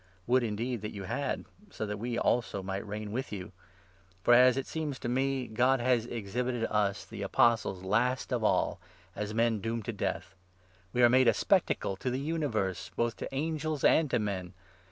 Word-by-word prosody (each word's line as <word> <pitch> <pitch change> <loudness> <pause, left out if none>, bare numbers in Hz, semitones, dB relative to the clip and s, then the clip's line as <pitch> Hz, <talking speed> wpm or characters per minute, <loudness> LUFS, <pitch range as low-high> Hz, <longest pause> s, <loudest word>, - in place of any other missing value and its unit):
Would 125 +3 +3
indeed 115 +1 -2
that 105 0 -6
you 100 - -5
had, 95 - -2 0.2
so 110 - -4
that 105 -1 -4
we 120 +1 -2
also 115 -5 0
might 95 +2 -4
reign 105 0 -5
with 130 +4 -3
you! 100 -1 -6 0.7
For, 120 - +5
as 125 +1 +6
it 135 - -1
seems 155 -4 -3
to - - -5
me, 135 +2 0
9 110 - -12
God 130 +3 +3
has 120 -1 +2
exhibited 120 +2 -2
us, 105 -2 0
the - - -8
Apostles, 110 -5 +2
last 125 +7 +1
of 120 -3 0
all, - - +2 0.4
as 105 +1 -4
men 115 -1 +2
doomed 115 0 -3
to 115 - -3
death. 100 -1 -3 0.6
We 125 - +2
are - - +9
made 130 +1 +5
a - - +5
spectacle 95 - +1
to 130 - -2
the 125 - -1
universe, 140 - -2
both 120 0 0
to - - -6
angels 155 0 -2
and 160 -3 +5
to 125 - +2
men 95 -5 -3
115 Hz, 195 wpm, -30 LUFS, 105-130 Hz, 0.7 s, are